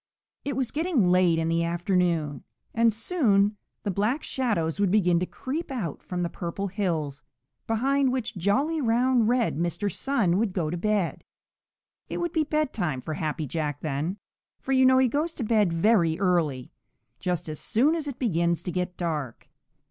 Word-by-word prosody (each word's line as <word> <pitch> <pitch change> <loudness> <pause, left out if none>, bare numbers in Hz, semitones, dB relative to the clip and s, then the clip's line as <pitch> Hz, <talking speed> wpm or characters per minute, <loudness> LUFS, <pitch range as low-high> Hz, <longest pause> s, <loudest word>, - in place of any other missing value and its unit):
It 280 -2 -3
was 260 -2 -1
getting 295 - +2
late 180 -2 +4
in 165 0 0
the 165 0 +1
afternoon, 170 -3 0 0.3
and 230 0 +4
soon 215 - +2 0.3
the 200 - -1
Black 215 - 0
Shadows 200 -11 -1
would 200 -2 +3
begin 180 -4 +3
to 180 - -2
creep 300 +6 -5
out 220 - -4
from 180 -1 -3
the - - 0
Purple 180 +4 -4
Hills, 165 -8 -2 0.5
behind 265 +4 +2
which 250 -4 -3
jolly, 270 - +1
round, 240 -1 +3
red 240 - +1
Mr. 175 +4 -1
Sun 210 -10 +1
would 215 -4 0
go 165 -5 -1
to - - -2
bed. 205 -1 0 0.9
It - - -3
would 345 -1 -1
be 320 - +2
bedtime 260 - -1
for 155 - -4
Happy 155 0 -2
Jack 150 -1 -3
then, 155 +5 -2 0.4
for 270 - -5
you 260 -1 +5
know 260 0 +5
he 260 0 +5
goes 305 +7 -1
to 250 - -3
bed 210 -5 +2
very 170 -2 +3
early, 165 -9 0 0.5
just 180 -3 -2
as 155 -1 -5
soon 270 +8 +2
as 320 -3 -2
it 275 -3 -5
begins 170 -7 0
to 180 - -3
get 180 0 -3
dark. 150 -8 -4
200 Hz, 175 wpm, -26 LUFS, 170-255 Hz, 0.9 s, you